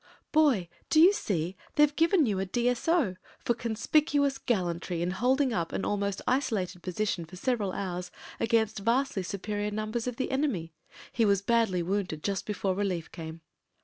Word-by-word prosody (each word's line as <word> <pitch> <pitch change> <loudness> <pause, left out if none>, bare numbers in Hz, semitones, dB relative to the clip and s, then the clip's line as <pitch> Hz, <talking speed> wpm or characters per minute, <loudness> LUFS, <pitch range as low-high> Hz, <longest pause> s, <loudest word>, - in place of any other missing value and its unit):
"Boy, 280 - +3 0.2
do 310 - +4
you 360 +5 +8
see, 180 - -2 0.2
they've 295 -1 +4
given 330 -1 +4
you 205 -5 0
a 190 - 0
D.S.O. 245 - +1 0.3
Tor 240 - +2
conspicuous 280 +5 +1
gallantry 175 -5 -1
in 175 - 0
holding 255 +6 +2
up 170 -5 -1
an - - -2
almost 200 -1 -1
isolated 210 -9 0
position 185 0 -2
for 170 +3 -12
several 210 -1 0
hours 180 -2 -4 0.3
against 220 -2 +1
vastly 230 0 +1
superior 205 +2 -3
numbers 215 +3 -3
of 250 - -2
the 260 - -2
enemy. 245 - -1 0.4
He 235 - +2
was 200 -2 +3
badly 220 -6 +2
wounded 180 -4 -2
just 200 -1 -2
before 200 -2 -1
relief 185 -4 -2
came.' 160 0 -8
210 Hz, 160 wpm, -29 LUFS, 185-250 Hz, 0.4 s, you